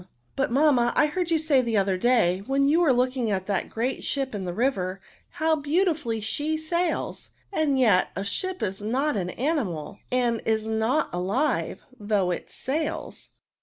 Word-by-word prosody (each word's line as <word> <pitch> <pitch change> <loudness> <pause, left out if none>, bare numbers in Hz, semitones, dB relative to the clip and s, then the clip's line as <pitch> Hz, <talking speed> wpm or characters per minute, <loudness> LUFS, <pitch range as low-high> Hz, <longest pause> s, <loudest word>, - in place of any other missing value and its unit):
* - - -43
" - - -45
*' - - -40
But, 270 - 0
mamma, 260 -3 +3
I - - +5
heard 345 +3 -2
you 330 - +3
say 300 -4 +3
the 230 -3 0
other 195 -1 +2
day, 190 -4 +2
when 275 +1 +2
you 310 +4 +4
were 335 -6 +4
looking 250 -1 +1
at 190 -2 -1
that 200 -1 -1
great 245 +4 -2
ship 270 -3 -2
in 200 -3 -4
the 175 - -2
river, 195 -6 0 0.3
how 315 +1 +2
beautifully 300 - 0
she 295 +9 -1
sails! 340 +2 -2 0.2
and 290 -6 +1
yet 210 -8 +4
a 195 - -2
ship 370 - -2
is 195 -1 -3
not 255 +7 0
an 180 -3 -2
animal, 225 - -2
and 240 -2 +1
is 220 -1 0
not 220 +7 +1
alive, 195 +12 -1 0.2
though 205 -3 +1
it 175 - -4
sails." 295 +4 -4
250 Hz, 185 wpm, -26 LUFS, 205-300 Hz, 0.3 s, I